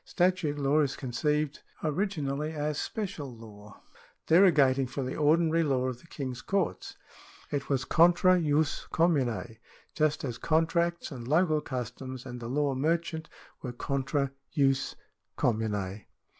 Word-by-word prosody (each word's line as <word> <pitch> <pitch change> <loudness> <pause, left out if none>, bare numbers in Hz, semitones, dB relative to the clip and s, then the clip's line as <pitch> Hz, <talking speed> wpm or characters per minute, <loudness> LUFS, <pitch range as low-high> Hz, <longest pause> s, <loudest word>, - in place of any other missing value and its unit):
Statute 180 -5 +1
law 145 +1 +2
is 140 -3 +1
conceived 150 +3 -1 0.2
originally 155 -3 -1
as 150 -1 -2
special 185 - -4
law, 105 -2 -13 0.4
derogating 145 -7 +5
from 130 +2 -4
the 130 - -4
ordinary 160 +2 +3
law 135 -5 +1
of 125 -2 -6
the - - -19
King's 130 -6 -5
courts. 195 -2 -2 0.5
It 145 -1 -2
was 135 -2 +1
contra 175 +2 +5
jus 150 -1 +1
commune, 125 - +1 0.4
just 155 -1 +1
as 120 -4 -4
contracts 170 +1 +1
and 120 -4 -7
local 155 +1 +3
customs 130 -1 -6
and 125 -1 -7
the 115 -1 -6
law 140 +1 +1
merchant 160 +3 -1 0.3
were 125 -3 -5
contra 140 +2 -1 0.2
jus 135 -2 +2 0.4
commune. 105 -4 -1
145 Hz, 130 wpm, -29 LUFS, 130-160 Hz, 0.5 s, derogating